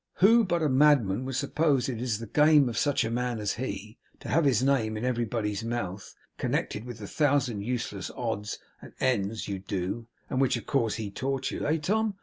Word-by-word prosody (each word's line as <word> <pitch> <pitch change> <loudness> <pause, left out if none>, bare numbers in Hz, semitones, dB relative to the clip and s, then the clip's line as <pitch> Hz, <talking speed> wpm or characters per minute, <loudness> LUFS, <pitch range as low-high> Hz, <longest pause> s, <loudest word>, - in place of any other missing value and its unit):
Who 225 +5 +6
but 175 -4 0
a - - +3
madman 130 -6 +3
would 135 -1 -4
suppose 140 -1 +1
it 120 -4 -3
is 120 -4 0
the 115 - -7
game 150 +3 +5
of 115 - -5
such 135 +5 +2
a 115 - -2
man 125 0 -1
as 105 -2 -1
he, 110 -2 -6 0.2
to - - -7
have 165 +1 +3
his 130 -3 +3
name 115 -6 +1
in 110 - -3
everybody's 115 -4 -1
mouth, 110 -5 -4 0.2
connected 105 - -2
with 120 -3 -7
the 105 -2 -8
thousand 135 -7 +1
useless 105 -4 -3
odds 110 -3 -3 0.2
and - - -12
ends 110 -4 0
you 100 -1 -3
do 100 +4 -4 0.2
(and 130 - -1
which, 130 -1 +2
of - - -8
course, 115 -7 +1
he 105 -3 -4
taught 135 +3 -2
you), - - -3
eh, 155 +2 +2
Tom? 210 +6 0
120 Hz, 205 wpm, -28 LUFS, 110-140 Hz, 0.2 s, Who